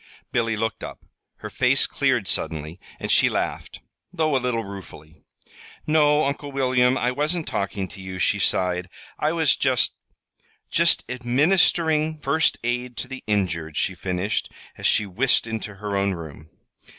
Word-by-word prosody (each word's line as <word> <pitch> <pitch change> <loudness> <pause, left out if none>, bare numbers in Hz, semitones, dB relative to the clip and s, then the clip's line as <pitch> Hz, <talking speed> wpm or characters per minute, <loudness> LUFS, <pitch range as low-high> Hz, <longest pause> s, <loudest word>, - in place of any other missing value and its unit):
Billy 115 -2 +1
looked 110 -1 -2
up. - - -8 0.4
Her - - -5
face - - +3
cleared - - 0
suddenly, 80 +2 -3 0.2
and - - -2
she - - +5
laughed - - -3 0.3
though 155 -3 +1
a 130 - +2
little 120 -2 -1
ruefully. 85 -5 -11 0.6
"No, 150 -1 +4
Uncle 140 +1 -3
William, 130 -1 +2
I 125 - +1
wasn't 155 +5 -1
talking 100 -1 -2
to 95 - -11
you," 95 0 -6
she 90 - +1
sighed. 90 0 +1 0.3
"I 150 - +1
was 160 -4 +3
just 130 -4 +2 0.8
just - - +4
administering 155 +5 +2
first 150 +2 +1
aid 120 0 -2
to - - -4
the 130 0 -8
injured," 85 -7 -1
she 95 - +1
finished, 90 +2 -2 0.2
as - - -1
she 105 - +3
whisked 115 +8 +2
into 110 -2 -5
her 100 0 -4
own 100 -1 +1
room. 80 -2 -10
120 Hz, 150 wpm, -24 LUFS, 95-140 Hz, 0.8 s, she